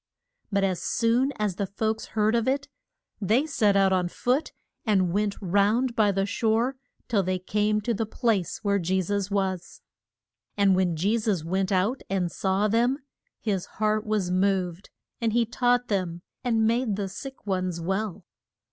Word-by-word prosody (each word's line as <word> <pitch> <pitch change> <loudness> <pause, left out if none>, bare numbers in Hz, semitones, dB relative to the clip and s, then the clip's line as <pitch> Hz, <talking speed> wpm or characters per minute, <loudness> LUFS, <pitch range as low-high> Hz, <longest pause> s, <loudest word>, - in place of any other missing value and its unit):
But 200 -1 +2
as 185 -3 0
soon 240 +7 +2
as 205 -4 -2
the 200 - -1
folks 220 +3 -2
heard 215 +1 +3
of 230 0 +1
it 280 +2 0 0.5
they 225 +9 +2
set 220 -10 +2
out 195 -1 +4
on 180 -1 +1
foot 250 - 0 0.3
and 190 -6 +2
went 205 0 0
round 210 +6 +2
by 210 -2 +4
the 195 0 0
shore 230 +5 +1 0.3
till 210 -4 +2
they 185 0 -1
came 210 +3 0
to 235 +3 -1
the 220 0 -2
place 220 -5 -1
where 200 -1 +2
Je 185 +2 0
sus 200 +1 -1
was. 190 -3 -2 0.7
And 200 -2 +4
when 180 -2 +1
Je 200 +8 +1
sus 210 -7 0
went 190 +3 0
out 200 +8 +1
and 185 -3 0
saw 195 +2 +1
them, 235 +5 +2 0.4
his 195 -5 -1
heart 215 0 +1
was 210 -4 -1
moved, 185 -1 0 0.3
and 225 -2 +1
he 235 0 +3
taught 245 +1 +1
them, 180 -4 -2 0.2
and 225 -3 +2
made 230 -1 +1
the 200 -1 -2
sick 265 +8 -9
ones 185 -3 -1
well. 190 +1 -3
205 Hz, 170 wpm, -26 LUFS, 190-225 Hz, 0.7 s, out